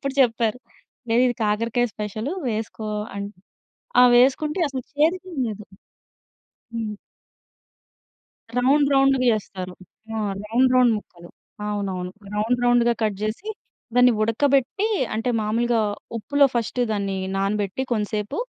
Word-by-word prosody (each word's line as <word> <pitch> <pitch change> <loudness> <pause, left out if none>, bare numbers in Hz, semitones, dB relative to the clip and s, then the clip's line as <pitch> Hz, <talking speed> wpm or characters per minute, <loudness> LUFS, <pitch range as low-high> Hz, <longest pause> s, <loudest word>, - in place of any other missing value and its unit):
అప్పుడు 275 -1 -2
చెప్పారు. 230 -2 +2 0.5
లేదిది 245 +2 +3
కాకరకాయ 230 +3 +1
స్పెషలు 215 +4 -4 0.2
వేసుకో 220 -1 -4 0.3
అని. 200 0 -4 0.7
ఆహ్, 250 0 +8
వేసుకుంటే 300 +7 +2
అసలు 265 -2 -5
చేదిగేం 340 +4 0
లేదు. 210 -1 -6 1.1
హ్మ్. 220 -2 -3 1.7
రౌండ్ 280 +3 +4
రౌండ్‌‌గా 270 -1 +4
చేస్తారు.ఆ! 195 +1 -6 0.3
రౌండ్ 245 +4 +3
రౌండ్ 250 -2 +5
ముక్కలు. 175 -4 -13 0.4
అవునవును. 190 -3 -3 0.2
రౌండ్ 220 +4 +1
రౌండ్‌‌గా 240 -1 +4
కట్ 215 -2 +1
జేసి, 215 - -3 0.5
దాన్ని 250 0 +6
ఉడకబెట్టీ, 275 - +2 0.3
అంటే 225 +3 -1
మామూలుగా 230 +2 +1 0.4
ఉప్పులో 285 +6 +3
ఫస్టు 235 +1 -1
దాన్ని 200 -2 -1 0.2
నానబెట్టి 200 +3 -1
కొంసేపు, 210 -1 -2
230 Hz, 105 wpm, -23 LUFS, 210-255 Hz, 1.7 s, ఆహ్